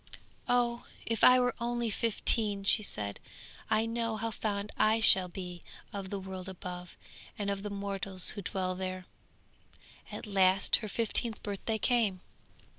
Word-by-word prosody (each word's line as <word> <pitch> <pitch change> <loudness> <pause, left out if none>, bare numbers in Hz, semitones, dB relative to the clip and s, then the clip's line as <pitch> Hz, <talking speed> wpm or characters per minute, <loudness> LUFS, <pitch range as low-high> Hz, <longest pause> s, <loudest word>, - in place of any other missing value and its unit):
'Oh! 240 -1 +1 0.2
if 230 -2 -1
I 255 0 +8
were 245 0 +2
only 235 -1 -1
fifteen!' 210 -2 0
she 210 +2 +4
said, 100 - -3 0.5
'I 220 +1 +2
know 230 -1 -1
how 225 +1 -2
fond 205 -1 -3
I 220 +1 +3
shall 190 -4 +7
be 180 -1 -7 0.3
of 195 -2 -5
the 200 - -3
world 190 0 -7
above, 180 -1 -8 0.4
and 200 -1 -1
of 200 0 -3
the 210 - -4
mortals 195 -2 -2
who 205 - -6
dwell 185 -1 -2
there.' 185 0 -4 1.1
At - - -6
last 195 -2 +4
her 215 - -6
fifteenth 230 +1 -1
birthday 205 +2 -2
came. 220 -6 +1
200 Hz, 150 wpm, -31 LUFS, 190-225 Hz, 1.1 s, I